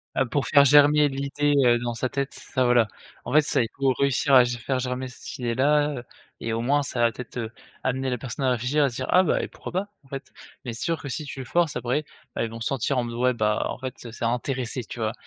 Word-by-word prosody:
Ah 130 - +2
pour 135 +3 -1
faire 140 -2 +6
germer 145 +1 +6
l'idée, 140 +1 0
heu, 120 -1 +5
dans 120 0 -3
sa 125 +2 -2
tête, 140 0 -3
ça 130 -2 -1
voilà. 120 -3 +4 0.4
En - - -6
fait, 155 - +6
c'est 115 -4 +1
pour 135 -2 +1
réussir 140 0 +2
à 125 -2 +9
ge 120 0 -2
à - - -13
faire 130 +3 -1
germer 130 +1 -3
cette 125 - -9
idée-là, 140 +2 +1 0.4
et 115 - -2
au 115 - -1
moins, 140 +5 +2
ça 130 -3 -3
va 115 -1 +4
peut-être, 125 +2 -9
heu, 115 -2 -3 0.3
amener 130 +1 -1
la 125 - -1
personne 130 +2 -5
à 130 - +3
réfléchir 125 +5 +1
à 140 - +3
se 120 - -10
dire: 130 - -3
«Ah 185 +1 +6
bah 165 - +1
et - - -3
pourquoi - - -9
pas, 190 +3 -1 0.2
en 135 - -23
fait?» 135 -1 -7 0.3
Mais 120 - -4
c'est - - -6
sûr 165 -1 -1
que 140 - -7
si 150 +4 -3
tu 140 -1 -8
le 130 - -5
forces 170 0 +1
après, 125 +5 -1 0.3
bah, - - 0
elles 115 - -2
vont 115 - -7
sentir 135 +2 -1
en 125 - +1
mode, 115 0 -6
ouais, 125 +1 +2
bah, 105 -2 0
en - - -4
fait, 130 -1 -5
c'est 120 -1 -6
intéressé, 125 +1 -2
tu 115 - -9
vois? 110 0 -1
130 Hz, 265 wpm, -25 LUFS, 120-140 Hz, 0.4 s, à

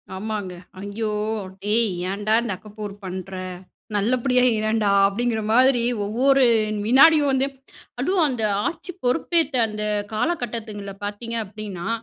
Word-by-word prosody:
ஆமாங்க. 205 -2 -4 0.3
ஐயோ! 205 +3 -3 0.5
டேய் 220 +3 +2 0.2
ஏன்டா 205 +2 -1
இந்த 235 -2 -3
அக்க 215 - -16
போர் 210 -2 -5
பண்ற! 185 0 -6 0.6
நல்லபடியா 250 +4 +2
இரேன்டா 215 -1 +1 0.2
அப்படிங்கிற 225 +2 -1
மாதிரி 255 0 +5 0.2
ஒவ்வொரு 265 +6 +3 0.4
வினாடியும் 285 +5 +6
வந்து 265 +1 +1 0.5
அதுவும் 350 +5 +2
அந்த 245 -5 -2 0.2
ஆட்சி 340 +2 -5
பொறுப்பேத்த 315 +3 +1
அந்த 210 0 -5 0.3
காலகட்டத்துங்கள்ல 215 - -3
பார்த்தீங்க 220 +3 -4
அப்படின்னா, 200 -3 -7
220 Hz, 115 wpm, -23 LUFS, 205-260 Hz, 0.6 s, வினாடியும்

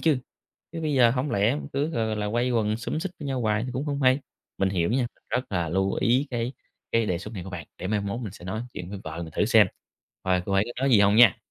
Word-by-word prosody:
chứ. 155 -5 +3 0.5
Chứ 165 - -4
bây 150 -2 0
giờ 120 -3 +6
hổng 130 +4 -1
lẽ 105 +6 +2
mình - - -6
cứ 140 +2 +1
gọi 115 -6 0
gọi 110 -1 -2
là 105 0 -2
quây 120 +2 +1
quần 110 -3 +1
xúm 115 +7 -3
xít 190 - -3
với 145 - -4
nhau 135 -2 -1
hoài 110 +1 +1
cũng 130 +4 -2
hông 140 -1 -2
hay. 130 +2 +4 0.4
Mình 95 -1 +2
hiểu 90 0 +1
nha, 125 0 +2 0.2
rất 125 - 0
là 85 -3 0
lưu 95 +3 +1
ý 125 +5 +2
cái 120 +1 -2 0.4
cái 115 -1 +3
đề 90 -3 0
xuất 105 +4 -8
này 90 -3 -5
của 95 - -8
bạn, 90 -3 -6
để 90 - -4
mai 105 0 +1
mốt 100 +4 -3
mình 105 -6 -5
sẽ 90 - -12
nói 110 +5 -3
chuyện 90 +2 -6
với 100 - -5
vợ 80 +2 -5
mình 80 -2 -8
thử - - +3
xem 110 -2 +6 0.6
coi 90 -1 +1
cô 100 - -2
ấy 95 +2 +4
có 120 +2 -6
nói 135 - +3
gì 110 - +6
hông 100 +1 +5
nha. 115 -6 +8
110 Hz, 285 wpm, -26 LUFS, 95-125 Hz, 0.6 s, nha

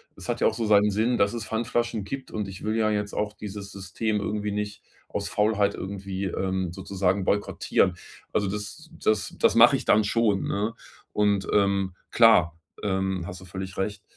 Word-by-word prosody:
das - - -10
hat - - -1
ja - - +5
auch - - +1
so 115 0 -2
seinen 105 0 +5
Sinn, 110 +5 +1
dass 100 +2 +2
es 115 -2 -4
Pfandflaschen 115 0 -1
gibt 135 +6 -6
und 105 -2 -3
ich 95 -1 -9
will 110 +1 -1
ja 110 -1 +2
jetzt 105 -1 -2
auch 105 0 -2
dieses 100 -1 -7
System 100 +3 -2
irgendwie 105 0 -2
nicht 105 0 -4 0.2
aus 100 0 -3
Faulheit 105 -1 +2
irgendwie, 95 0 -5
ähm, 95 -1 -2
sozusagen 95 0 -1
boykottieren. 100 +2 +1 0.4
Also 100 -2 +1
das 105 +11 -6
das 110 -2 0
das - - +4
mache - - +8
ich - - -7
dann 110 - +5
schon, 105 -2 +1
ne? 105 +3 -1 0.4
Und, 105 -1 +2
ähm, 100 -2 +2 0.2
klar, 85 -8 +5 0.2
ähm, 95 -2 -1
hast 90 +1 -7
du - - -11
völlig 95 +1 -7
recht. 100 +1 -3
100 Hz, 185 wpm, -26 LUFS, 95-105 Hz, 0.4 s, mache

